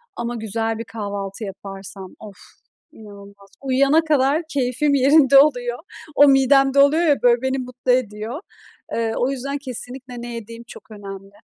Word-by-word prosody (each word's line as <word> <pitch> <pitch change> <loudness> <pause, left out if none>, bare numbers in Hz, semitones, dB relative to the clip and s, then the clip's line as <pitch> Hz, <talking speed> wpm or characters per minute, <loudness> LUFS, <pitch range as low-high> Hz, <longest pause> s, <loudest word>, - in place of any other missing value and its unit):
Ama 235 0 -4
güzel 225 0 -2
bir 230 - -5
kahvaltı 200 -1 -6
yaparsam. 195 -1 -9
Of, 210 -2 -11 0.6
inanılmaz. 200 -2 -15
Uyuyana 275 +3 +3
kadar 295 0 +2
keyfim 270 +2 0
yerinde 275 0 +5
oluyor. 245 -4 +1 0.4
O 290 - +7
midemde 270 0 +4
oluyor 295 +5 +4
ya, 295 -4 +2
böyle 240 -1 +3
beni 265 0 -1
mutlu 250 0 -3
ediyor. 230 +1 -2 0.5
Eee, 225 -1 -1
o 250 - 0
yüzden 275 +2 -4
kesinlikle 255 -2 -8
ne 240 0 -7
yediğim 230 +1 -9
çok 230 - -14
önemli. 195 -1 -10
245 Hz, 145 wpm, -21 LUFS, 215-275 Hz, 0.6 s, O